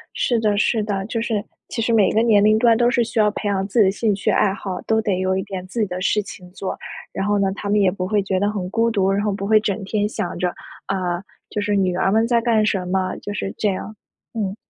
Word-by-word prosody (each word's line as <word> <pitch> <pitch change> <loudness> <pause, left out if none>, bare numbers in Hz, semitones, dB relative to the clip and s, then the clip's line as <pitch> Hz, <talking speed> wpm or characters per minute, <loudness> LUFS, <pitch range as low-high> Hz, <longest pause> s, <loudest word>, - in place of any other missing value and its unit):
是 240 - +1
的 210 -2 +1
是 220 +1 +2
的， 200 -2 -2
就 230 +1 -2
是 220 -3 -1 0.2
其 230 - -4
实 230 +1 +1
每 215 -4 +4
个 220 - +3
年 215 -3 +4
龄 215 +1 +5
段 230 -1 +4
都 240 +1 +3
是 245 -2 +2
需 230 - -4
要 210 -1 +4
培 210 0 -4
养 195 -1 0
自 205 - -1
己 210 - +7
的 - - +4
兴 210 +1 0
趣 195 - 0
爱 200 - +3
好， 195 -2 -5
都 220 0 +1
得 205 -4 -1
有 185 0 +1
一 190 - -1
点 190 -2 -6
自 230 +5 -4
己 215 - +2
的 180 0 -5
事 210 +2 +1
情 180 -2 -11
做。 195 0 -4 0.4
然 195 - -2
后 205 0 +2
呢， 195 -1 +1
他 200 - -6
们 210 0 +3
也 195 -2 +4
不 185 -1 -4
会 205 -2 +2
觉 190 -1 -1
得 205 +1 +1
很 195 -4 -4
孤 230 +2 +2
独， 195 -3 +1
然 200 +1 0
后 210 - +1
不 195 0 -4
会 215 0 +5
整 210 0 -2
天 210 +1 0
想 175 -5 -4
着， 180 0 +1 0.4
啊， 180 -2 -2 0.3
就 210 - -3
是 205 0 0
女 185 -2 +1
儿 190 - +2
们 225 +2 +3
在 235 0 +2
干 225 -2 +2
什 190 -4 0
么， 185 0 -1
就 205 - -6
是 195 -1 -4
这 215 - 0
样， 195 +2 -5 0.4
嗯。 200 -3 -2
205 Hz, 300 characters per minute, -21 LUFS, 190-220 Hz, 0.4 s, 己